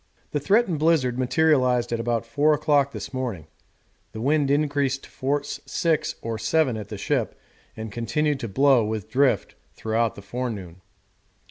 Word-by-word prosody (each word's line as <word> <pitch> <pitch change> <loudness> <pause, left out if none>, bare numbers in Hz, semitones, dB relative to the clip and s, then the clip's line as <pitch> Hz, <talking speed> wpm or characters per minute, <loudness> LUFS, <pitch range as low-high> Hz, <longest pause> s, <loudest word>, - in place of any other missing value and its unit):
The 145 - 0
threatened 195 - +2
blizzard 145 -6 +2
materialised 130 -3 +2
at 115 - -1
about 115 0 -1
four 150 +6 +2
o'clock 145 -2 +2
this - - -7
morning. 120 - -3 0.7
The 110 - -6
wind 145 +2 +2
increased 140 -2 +1
to - - -14
force 145 +2 -2
six 160 -3 0
or 115 -1 -3
seven 150 -1 +1
at 105 -2 -6
the - - -7
ship, - - -1 0.4
and 110 -1 -6
continued 140 +6 -1
to 115 - -4
blow, 135 +3 +4
with 110 -2 -4
drift, 135 0 +2 0.2
throughout 110 0 0
the 100 - -11
forenoon. 100 -6 -5
130 Hz, 155 wpm, -24 LUFS, 115-145 Hz, 0.7 s, blow